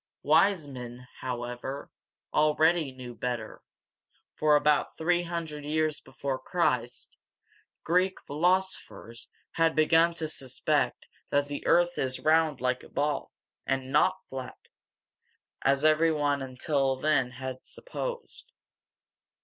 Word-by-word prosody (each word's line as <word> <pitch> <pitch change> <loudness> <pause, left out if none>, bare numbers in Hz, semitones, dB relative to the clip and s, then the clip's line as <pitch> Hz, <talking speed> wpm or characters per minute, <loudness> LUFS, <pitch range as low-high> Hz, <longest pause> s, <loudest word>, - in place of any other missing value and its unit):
Wise 160 +1 +4
men, 125 -2 -9
however, 125 +2 -5 0.4
already 155 0 +3
knew 125 -2 -9
better; 120 -1 -4 0.7
for, 150 -1 +3
about 150 0 +2
three 175 +2 +2
hundred 165 -4 -5
years 155 +1 0
before 135 -2 -4
Christ, 125 -9 -1 0.7
Greek 185 +3 +2
philosophers 175 -7 -1 0.2
had 165 0 +2
begun 165 +2 +4
to 160 -1 -2
suspect 135 -4 -1 0.2
that 145 0 +2
the 145 - -5
earth 175 +1 +3
is 130 -1 -1
round 155 -3 +3
like 125 0 0
a - - -14
ball, 145 +1 -1 0.4
and 135 -1 -1
not 185 +6 +4
flat, 130 -1 -7 1.0
as 140 +2 +2
every 155 +1 +5
one 145 -2 +1
until 135 +1 0
then 135 -2 +2
had 130 0 -6
supposed. - - -6
150 Hz, 115 wpm, -28 LUFS, 130-165 Hz, 1.0 s, every